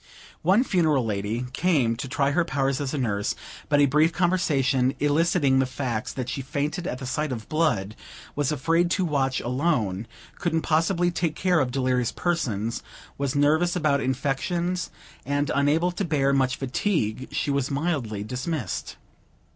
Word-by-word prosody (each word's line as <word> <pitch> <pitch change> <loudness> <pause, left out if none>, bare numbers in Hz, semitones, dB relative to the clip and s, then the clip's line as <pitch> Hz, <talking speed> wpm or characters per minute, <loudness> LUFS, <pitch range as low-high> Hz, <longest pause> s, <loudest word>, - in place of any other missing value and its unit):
One 190 +9 +4
funereal 160 - +2
lady 105 +3 -2
came 140 -9 +2
to 130 - -4
try 140 +2 +1
her 175 +4 +2
powers 135 -2 -1
as 135 -2 -2
a 150 - -2
nurse; 105 -6 -1 0.3
but, 145 -1 +4
a 145 - +6
brief 150 +4 +3
conversation 145 -8 +1
eliciting 145 -2 +3
the 130 - +2
facts 125 -4 -3
that 130 -2 -4
she 135 - -3
fainted 145 +6 -3
at - - -3
the 130 - -7
sight 150 +3 -2
of 115 -3 -5
blood, 120 -11 0 0.4
was 145 0 0
afraid 165 +4 +2
to 185 +1 +1
watch 135 -4 0
alone, 120 - 0 0.3
couldn't 165 -2 0
possibly 170 +2 +2
take 165 -2 -1
care 180 -3 +2
of 135 -3 +1
delirious 125 -2 0
persons, 115 - -1 0.4
was 140 -1 -1
nervous 155 +5 +3
about 150 -5 +2
infections, 165 +7 -1 0.3
and 145 +1 0
unable 155 +5 +2
to 180 - -3
bear 140 -5 +1
much 135 -1 +2
fatigue, 130 - -1
she 145 - -1
was 140 -1 0
mildly 140 -9 -2
dismissed. 125 - -4
140 Hz, 160 wpm, -25 LUFS, 130-165 Hz, 0.4 s, a